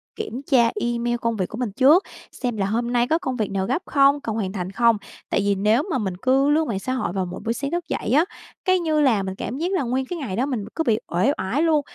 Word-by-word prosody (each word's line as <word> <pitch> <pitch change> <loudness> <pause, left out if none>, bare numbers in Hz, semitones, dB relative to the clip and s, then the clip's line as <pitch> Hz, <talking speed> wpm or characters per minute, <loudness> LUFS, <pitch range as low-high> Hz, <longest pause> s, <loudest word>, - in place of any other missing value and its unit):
kiểm 275 - -5
tra 235 -3 +5
email 240 0 -1
công 230 -1 0
việc 185 -4 -2
của 220 - -7
mình 245 -4 -2
trước, 275 - +5 0.3
xem 245 -4 -3
là 195 - 0
hôm 235 +4 -1
nay 240 0 +2
có 320 - +2
công 260 -7 -3
việc 215 -4 -1
nào 195 -1 -1
gấp 265 +8 0
không, 280 0 +4
cần 225 -4 -3
hoàn 200 -4 -2
thành 185 -2 -4
không. 230 +2 +3 0.3
Tại - - +1
vì 200 0 +1
nếu 215 +7 +2
mà 270 - +1
mình 190 -6 -3
cứ 265 +6 +2
lướt 310 +2 +3
mạng 215 -8 -2
xã 255 +6 -3
hội 255 -8 -2
vào 190 -2 -1
mỗi 180 0 -7
buổi 230 - +1
sáng 280 +4 -4
thức 345 -1 -2
dậy - - -3
á, 300 +6 +5 0.4
cái, 370 -1 +3
như 315 -3 +1
là 230 -8 +3
mình 190 0 -4
cảm 240 +6 -5
giác 345 +5 -1
là 370 -6 +1
nguyên 260 +2 -1
cái 350 +6 -5
ngày 230 -11 -4
đó 245 +5 +1
mình 250 -8 -3
cứ 325 - 0
bị 230 -6 +2
uể 185 +11 +2
oải 225 +10 -1
luôn, 320 -2 +3
240 Hz, 280 wpm, -23 LUFS, 210-285 Hz, 0.4 s, tra